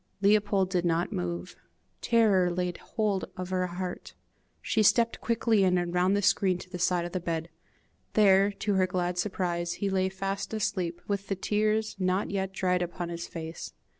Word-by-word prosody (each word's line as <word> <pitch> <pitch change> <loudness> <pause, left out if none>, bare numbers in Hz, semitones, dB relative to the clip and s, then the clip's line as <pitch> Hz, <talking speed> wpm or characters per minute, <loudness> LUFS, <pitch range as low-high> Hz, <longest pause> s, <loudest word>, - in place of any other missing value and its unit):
Leopold 200 -2 +3
did 180 -2 +1
not 170 0 0
move. 85 -1 -4 0.5
Terror 210 -6 +3
laid 180 0 -2
hold 210 -4 -1
of 185 0 -5
her 185 -1 0
heart. 180 +1 -6 0.4
She 220 - 0
stepped 230 +2 +3
quickly 230 -3 +2
in, 180 -1 +3
and 175 -1 -2
round 180 +2 +3
the 205 - -1
screen 185 -1 +3
to 180 - -11
the 180 - -5
side 175 0 +1
of 175 - -6
the 185 - -2
bed. 165 -1 -3 0.6
There, 200 -1 +5
to 205 +1 -2
her 185 -1 +3
glad 180 -1 -1
surprise, 175 -3 -1
he 200 -2 -2
lay 190 0 +1
fast 195 +3 -4
asleep, 180 -5 -2
with 200 -1 -2
the 195 - -1
tears 215 +2 0
not 185 +2 0
yet 195 -1 -2
dried 180 -2 0
upon 175 0 -4
his 170 0 -5
face. 160 -1 -7
185 Hz, 180 wpm, -28 LUFS, 175-200 Hz, 0.6 s, There